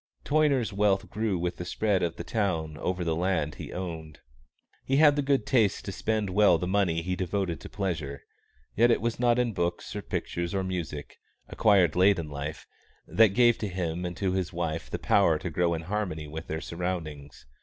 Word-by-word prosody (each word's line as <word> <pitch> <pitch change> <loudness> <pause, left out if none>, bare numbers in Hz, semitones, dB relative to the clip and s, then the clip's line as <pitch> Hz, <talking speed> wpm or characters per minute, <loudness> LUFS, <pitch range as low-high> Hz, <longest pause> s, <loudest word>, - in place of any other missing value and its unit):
Toyner's 140 -7 +2
wealth 100 -1 +1
grew 105 -3 -1
with 90 +1 -2
the - - -5
spread 100 +2 0
of 85 -2 -1
the - - -6
town 85 -7 -1
over 90 +2 -2
the 80 -1 0
land 85 -3 0
he - - -8
owned. 80 -4 -6 0.6
He 135 - 0
had 150 -1 +6
the 145 - +1
good 135 -4 +1
taste 110 -6 +2
to 100 - -4
spend 110 -1 -1
well 100 -3 +5
the 85 - -3
money 90 -3 +1
he 90 +1 -2
devoted 95 -1 -2
to - - -9
pleasure; 85 -8 -4 0.5
yet 120 +3 +5
it 115 - +3
was 120 0 -2
not 120 -1 +3 0.2
books 85 -1 -2
or - - -3
pictures 85 +2 -3
or 95 - 0
music, 85 -6 -5 0.3
acquired 95 -7 +3
late 95 +2 +5
in 80 -3 -5
life, 70 +2 -5 0.4
that 110 -3 +4
gave 120 -1 +5
to 105 - -2
him 90 -2 -3
and 90 -1 -4
to 95 -2 0
his 95 0 -1
wife 85 -2 -3
the - - -3
power 85 -6 +3
to 85 +2 -5
grow 85 +1 +1
in 80 - -5
harmony 90 -5 -3
with 80 +2 -7
their 80 +1 -3
surroundings. 80 -7 -5
90 Hz, 200 wpm, -28 LUFS, 80-105 Hz, 0.6 s, had